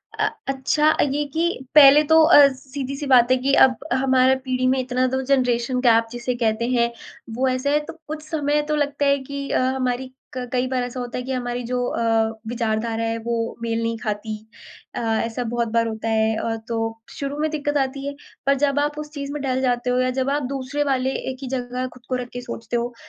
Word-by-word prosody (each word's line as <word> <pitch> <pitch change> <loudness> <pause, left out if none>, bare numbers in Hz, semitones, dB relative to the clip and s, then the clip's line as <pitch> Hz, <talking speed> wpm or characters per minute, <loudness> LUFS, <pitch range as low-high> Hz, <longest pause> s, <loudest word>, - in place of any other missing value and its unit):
अ - - +1 0.2
अच्छा 275 +3 +2 0.2
ये 295 +2 0
कि 325 - +1 0.3
पहले 290 0 +9
तो 320 0 +8
अ, 290 -3 +8
सीधी-सी 275 +2 -6
बात 250 -2 +5
है 255 - +5
कि 270 +2 0
अब 255 -1 0 0.2
हमारा 260 0 +3
पीढ़ी 255 0 0
में 260 +1 +2
इतना 255 0 0
तो 265 +1 -1
जनरेशन 250 -1 +1
गैप 230 -2 +4
जिसे 240 +1 -3
कहते 230 -1 0
हैं, 235 -2 +2 0.4
वो 260 +2 +1
ऐसा 255 +2 0
है। 295 - +3
तो - - -8
कुछ 305 0 -5
समय 295 -1 +1
तो - - +2
लगता 290 -1 0
है 280 0 +4
कि 280 0 -4
अ, - - +1 0.2
हमारी 255 0 -1
क - - -31 0.4
कई 250 0 +1
बार 255 -1 -1
ऐसा 245 +1 -5
होता 245 0 -5
है 250 - -3
कि 260 - -5
हमारी 245 -1 -3
जो 250 +1 -2
अ, 225 -2 +1 0.2
विचारधारा 225 -1 -1
है 225 0 -1
वो 230 -1 -2
मेल 230 0 -1
नहीं 230 0 -1
खाती। 215 -1 -4 0.6
अ, - - -2 0.3
ऐसा 230 +2 -3
बहुत 235 0 -1
बार 230 0 +2
होता 220 0 -4
है। 220 0 +2
अ, 225 +1 -2
तो 225 -1 -2
शुरू 280 0 -5
में 310 +1 +1
दिक़्क़त 290 -1 -1
आती 275 0 -2
है। 285 - -3 0.3
पर 275 - +4
जब 285 0 +2
आप 295 +1 -1
उस 300 0 -6
चीज़ 280 -2 -5
में 295 - -4
ढल 260 -1 -1
जाते 245 -1 0
हो 250 - +1
या 255 0 +2
जब 260 +1 -1
आप 290 +1 0
दूसरे 275 +2 -2
वाले 265 -2 0 0.2
एक 260 - -9
ही 270 - -5
जगह 250 -1 -3
ख़ुद 250 -1 -16
को 255 - 0
रख 250 -1 -4
के 245 - -5
सोचते 235 -1 -6
हो, 240 +1 -3
255 Hz, 225 wpm, -22 LUFS, 235-275 Hz, 0.6 s, पहले